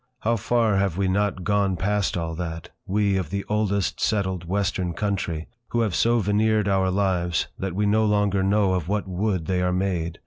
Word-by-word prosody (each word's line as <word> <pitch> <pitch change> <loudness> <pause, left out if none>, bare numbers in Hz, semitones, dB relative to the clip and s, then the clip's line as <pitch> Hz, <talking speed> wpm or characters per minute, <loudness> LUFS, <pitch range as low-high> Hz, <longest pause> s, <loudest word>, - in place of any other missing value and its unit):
How 115 +2 +1
far 115 -1 +1
have 95 -3 0
we 100 -1 +1
not 95 -1 0
gone 100 -2 +1
past 100 +1 0
all 80 -1 -3
that—we 90 +4 -2
of 90 -6 -3
the 100 +1 -3
oldest 100 -3 0
settled 95 -5 0
Western 95 -1 -1
country, 95 -5 -2 0.2
who 120 - 0
have 110 -5 0
so 115 +8 +3
veneered 105 0 +2
our 95 -1 +2
lives 90 -3 0
that 95 -2 -3
we 105 +1 +1
no 110 +2 +3
longer 105 -2 +2
know 100 0 +2
of 90 -4 -1
what 105 0 -1
wood 95 -2 -1
they 90 +1 0
are 90 0 +1
made! 90 -3 -1
95 Hz, 185 wpm, -24 LUFS, 90-105 Hz, 0.2 s, so